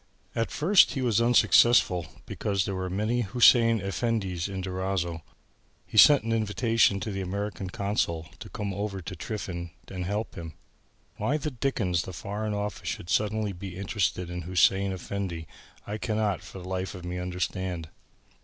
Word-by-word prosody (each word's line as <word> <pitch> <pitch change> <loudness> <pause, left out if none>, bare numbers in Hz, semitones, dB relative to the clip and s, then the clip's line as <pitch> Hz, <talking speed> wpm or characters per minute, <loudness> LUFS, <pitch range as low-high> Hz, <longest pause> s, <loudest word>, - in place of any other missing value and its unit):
At 115 -2 -1
first 180 +6 +4
he 135 - -2
was 115 -2 +2
unsuccessful 120 -7 +5 0.2
because 100 -3 -1
there 100 - -3
were 95 -1 -3
many 110 +6 0
Hussein 115 +1 +5
Effendis 95 -3 -1
in 95 -1 -4
Durazzo. 90 -3 -2 0.6
He - - -12
sent 140 +5 +8
an 115 - -2
invitation 110 -1 +2
to 110 - -3
the 95 0 -3
American 100 0 -4
Consul 90 -5 -1
to - - -9
come 100 -2 -4
over 100 0 -3
to 95 +1 -7
tiffin 85 -3 -5 0.2
and 90 -2 -4
help 105 +4 -2
him. 80 -2 -7 0.6
"Why 145 - 0
the 150 0 -3
dickens 110 -9 0
the 95 - -7
Foreign 105 +4 -3
Office 105 +1 -4
should 85 - -5
suddenly 105 -1 +1
be 90 0 -8
interested 95 -3 -1
in 90 0 -4
Hussein 95 +3 +3
Effendi, 95 -2 -4 0.4
I 105 +1 -4
cannot 105 -6 0
for - - -11
the 90 -1 -8
life 95 +1 -3
of 90 -1 -9
me 90 +1 -4
understand." 90 -2 -3
100 Hz, 165 wpm, -27 LUFS, 90-110 Hz, 0.6 s, sent